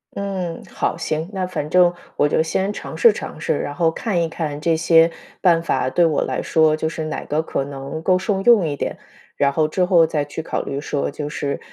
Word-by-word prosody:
嗯， 190 Hz, -4 st, -4 dB
好， -, -, -1 dB
行， 160 Hz, -1 st, -3 dB
那 185 Hz, -2 st, -2 dB
反 150 Hz, -5 st, -4 dB
正 180 Hz, -1 st, +5 dB, 0.3 s
我 145 Hz, -, +4 dB
就 160 Hz, -, +2 dB
先 190 Hz, +5 st, -1 dB
尝 -, -, -7 dB
试 470 Hz, -, +6 dB
尝 -, -, -7 dB
试， -, -, 0 dB
然 145 Hz, -, -4 dB
后 165 Hz, +1 st, +2 dB
看 180 Hz, +1 st, -1 dB
一 165 Hz, -, -2 dB
看 150 Hz, -3 st, -4 dB
这 165 Hz, +1 st, +2 dB
些 165 Hz, 0 st, +5 dB, 0.3 s
办 170 Hz, -3 st, +4 dB
法 130 Hz, -5 st, 0 dB
对 170 Hz, +6 st, +3 dB
我 155 Hz, -3 st, +1 dB
来 130 Hz, -, -2 dB
说 160 Hz, -1 st, +3 dB
就 160 Hz, -, -1 dB
是 160 Hz, 0 st, -4 dB
哪 155 Hz, -, -4 dB
个 150 Hz, +2 st, 0 dB
可 140 Hz, -3 st, -3 dB
能 140 Hz, +2 st, -6 dB
够 185 Hz, +1 st, +3 dB
受 190 Hz, +1 st, -1 dB
用 205 Hz, -5 st, +5 dB
一 145 Hz, -, -2 dB
点。 -, -, -4 dB, 0.4 s
然 140 Hz, -1 st, +2 dB
后 155 Hz, +2 st, +1 dB
之 180 Hz, +4 st, 0 dB
后 175 Hz, -2 st, +5 dB
再 155 Hz, -2 st, -1 dB
去 145 Hz, +2 st, -6 dB
考 -, -, -2 dB
虑 140 Hz, -, -4 dB
说， 145 Hz, -1 st, -2 dB
就 145 Hz, +1 st, -5 dB
是 145 Hz, -1 st, -3 dB
160 Hz, 245 characters per minute, -21 LUFS, 150-180 Hz, 0.4 s, 试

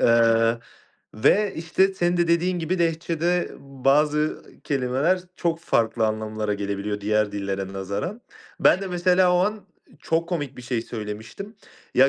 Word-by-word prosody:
eee, 115 Hz, 0 st, +4 dB, 0.6 s
ve 200 Hz, -, +3 dB
işte, 185 Hz, +4 st, +1 dB
senin 175 Hz, -1 st, +1 dB
de 175 Hz, -1 st, +2 dB
dediğin 175 Hz, +2 st, +2 dB
gibi 175 Hz, +2 st, -1 dB
Lehçe'de 170 Hz, +1 st, 0 dB
bazı 145 Hz, +3 st, +1 dB, 0.2 s
kelimeler 140 Hz, +6 st, +1 dB, 0.2 s
çok 165 Hz, -1 st, -1 dB
farklı 115 Hz, -7 st, +1 dB
anlamlara 110 Hz, -1 st, -2 dB
gelebiliyor, 100 Hz, +1 st, -3 dB
diğer 105 Hz, 0 st, +1 dB
dillere 100 Hz, -1 st, -3 dB
nazaran. 100 Hz, -, -4 dB, 0.4 s
Ben 185 Hz, -, +5 dB
de -, -, -3 dB
mesela 180 Hz, 0 st, +3 dB
o -, -, +4 dB
an 205 Hz, +2 st, 0 dB, 0.4 s
çok 165 Hz, +2 st, 0 dB
komik 145 Hz, -7 st, -3 dB
bir 125 Hz, -, -9 dB
şey 120 Hz, -2 st, -2 dB
söylemiştim. 110 Hz, -, -7 dB, 0.4 s
Ya, 135 Hz, +2 st, +6 dB
145 Hz, 140 wpm, -24 LUFS, 110-175 Hz, 0.6 s, Ya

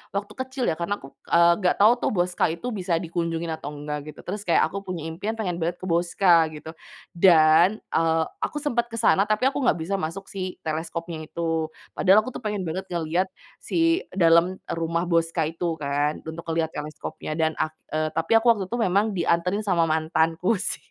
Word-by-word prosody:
waktu 200 Hz, +1 st, -2 dB
kecil 260 Hz, 0 st, -4 dB
ya, 160 Hz, -, -1 dB
karena 175 Hz, +4 st, -1 dB
aku, 135 Hz, -, -12 dB, 0.2 s
eee, 170 Hz, 0 st, +5 dB
nggak 180 Hz, -2 st, +2 dB
tahu 215 Hz, +3 st, +8 dB
tuh -, -, 0 dB
Boscha 180 Hz, -1 st, +1 dB
itu 170 Hz, +10 st, -4 dB
bisa 185 Hz, -5 st, -1 dB
dikunjungi 165 Hz, -1 st, -3 dB
atau 150 Hz, -2 st, -5 dB
enggak, 150 Hz, +1 st, -6 dB
gitu. -, -, -13 dB
Terus 205 Hz, +3 st, -5 dB
kayak 170 Hz, -, +4 dB
aku 200 Hz, -, -4 dB
punya 180 Hz, -4 st, -5 dB
impian 200 Hz, +7 st, -3 dB
pengen 180 Hz, -6 st, -3 dB
banget 170 Hz, +2 st, -1 dB
ke -, -, -16 dB
Boscha, 170 Hz, 0 st, +4 dB
gitu, 155 Hz, +1 st, -9 dB, 0.5 s
dan, 170 Hz, +3 st, +5 dB
eee, 165 Hz, 0 st, +2 dB, 0.2 s
aku 295 Hz, -, -3 dB
sempat 240 Hz, -5 st, 0 dB
ke 230 Hz, -, -8 dB
sana 200 Hz, -2 st, +3 dB
tapi 215 Hz, +5 st, +2 dB
aku 275 Hz, -, -5 dB
nggak 255 Hz, -, +3 dB
bisa 195 Hz, +4 st, -1 dB
masuk 185 Hz, +5 st, -5 dB
si 185 Hz, -2 st, -4 dB
teleskopnya 160 Hz, 0 st, -4 dB
itu, 165 Hz, -1 st, -2 dB, 0.3 s
padahal 195 Hz, +3 st, +6 dB
aku 255 Hz, -, -5 dB
tuh -, -, -12 dB
pengen 210 Hz, -2 st, -1 dB
banget 185 Hz, +3 st, -4 dB
ngelihat 170 Hz, +3 st, 0 dB, 0.3 s
si 335 Hz, +5 st, +1 dB
dalam 170 Hz, +1 st, +4 dB
rumah 165 Hz, +1 st, -1 dB
Boscha 165 Hz, -1 st, +1 dB
itu 165 Hz, 0 st, -2 dB
kan, 145 Hz, +1 st, -1 dB
untuk 160 Hz, +1 st, -7 dB
ngelihat 165 Hz, -1 st, -1 dB
teleskopnya 155 Hz, 0 st, -6 dB
dan 160 Hz, 0 st, +1 dB
ak 155 Hz, 0 st, -1 dB, 0.2 s
eee, 155 Hz, 0 st, -1 dB
tapi 165 Hz, +5 st, -2 dB
aku 225 Hz, -, -1 dB
waktu 200 Hz, -3 st, -4 dB
itu 240 Hz, -, -2 dB
memang 205 Hz, +1 st, +2 dB
dianterin 180 Hz, +5 st, +1 dB
sama 170 Hz, -4 st, +2 dB
mantanku 160 Hz, +5 st, +1 dB
sih. 215 Hz, -, 0 dB
170 Hz, 190 wpm, -24 LUFS, 160-200 Hz, 0.5 s, tahu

